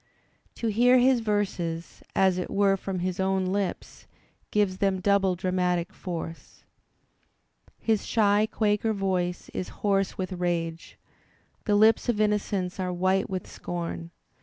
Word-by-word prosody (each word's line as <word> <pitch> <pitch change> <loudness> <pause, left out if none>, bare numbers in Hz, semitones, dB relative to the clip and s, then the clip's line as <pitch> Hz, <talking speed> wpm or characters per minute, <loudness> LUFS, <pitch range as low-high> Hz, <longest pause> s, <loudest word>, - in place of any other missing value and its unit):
To 230 - -2
hear 245 +4 +5
his 255 0 +4
verses, 190 -6 -2
as 190 -1 +3
it 180 - -4
were 200 -1 +3
from 190 -1 -4
his 185 0 -2
own 190 0 +1
lips, 195 +1 -3 0.4
gives 200 -3 +1
them 195 -1 +1
double 195 -1 +2
dramatic 180 -1 0
force. 165 -2 -7 1.1
His 220 -2 0
shy 210 -1 +3
Quaker 215 +1 +1
voice 185 -3 -2
is 185 - -5 0.2
hoarse 195 -2 +1
with 185 0 -3
rage, 170 -2 -3 0.7
the 210 - +2
lips 220 +4 +4
of 225 -3 +1
innocence 205 -3 0
are 185 -1 -1
white 185 +2 +1
with 185 -2 -3
scorn. 170 -1 -5
190 Hz, 135 wpm, -27 LUFS, 180-205 Hz, 1.1 s, hear